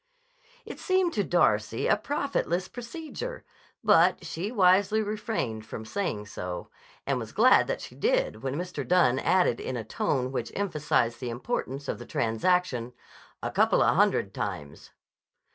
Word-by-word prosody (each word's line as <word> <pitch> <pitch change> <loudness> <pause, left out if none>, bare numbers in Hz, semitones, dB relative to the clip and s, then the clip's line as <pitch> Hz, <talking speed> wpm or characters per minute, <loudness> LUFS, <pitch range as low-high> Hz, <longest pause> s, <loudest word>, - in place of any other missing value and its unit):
It - - -8
seemed 370 -3 +1
to 205 - +1
Darcy 110 - +1
a - - +4
profitless 275 - -1
procedure, 315 - -7 0.4
but 185 -4 +4
she 175 +6 -4
wisely 200 0 +4
refrained 210 - -3
from 110 - -7
saying 110 - -3
so, 90 -3 -6 0.3
and 135 -2 0
was 115 -2 -7
glad 240 +5 +5
that - - -2
she - - -9
did - - 0
when 135 0 -3
Mr. 180 +3 -4
Dunne 170 -8 +3
added 175 -8 +2
in 130 - -4
a 115 - -4
tone 125 +4 -1
which 135 - -3
emphasized 150 -11 0
the 125 - -4
importance 135 - -4
of - - -3
the 120 - -9
transaction: 125 +1 0 0.5
"A - - -2
coupla - - +3
hundred - - +2
times." 70 -1 -5
175 Hz, 145 wpm, -27 LUFS, -, 0.5 s, glad